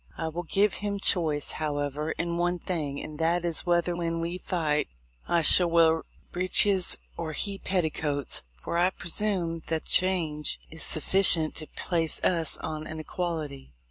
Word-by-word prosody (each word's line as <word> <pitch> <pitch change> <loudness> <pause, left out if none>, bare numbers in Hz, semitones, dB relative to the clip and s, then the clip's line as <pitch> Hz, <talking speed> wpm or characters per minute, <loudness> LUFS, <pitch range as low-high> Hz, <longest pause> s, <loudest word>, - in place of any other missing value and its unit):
I 160 - -3
will 170 +2 -5
give 195 +4 +1
him 200 -1 -3
choice, 155 -7 +2
however, 150 0 -3
in 170 0 -3
one 175 +1 0
thing, 155 -6 -4
and 155 0 -9
that 170 +2 0
is, 170 +1 -2
whether, 175 0 +1
when 165 -1 -3
we 170 +2 -4
fight, 155 -5 -1 0.4
I 170 -1 +1
shall 175 +3 +8
wear 165 -1 +3 0.3
breeches 185 +1 +3 0.2
or 160 -2 -5
he 200 +4 -1
petticoats, 155 -6 -1
for, 170 - -4
I 180 +1 +3
presume 175 -2 0
that 160 -1 -3
change 170 -5 +1
is 160 0 -7
suffi 175 +5 +1
cient 160 -5 +5
to 155 - -5
place 165 -3 0
us 165 -3 +2
on 155 0 -6
an 160 0 -7
equality. 155 - -5
165 Hz, 160 wpm, -27 LUFS, 155-180 Hz, 0.4 s, shall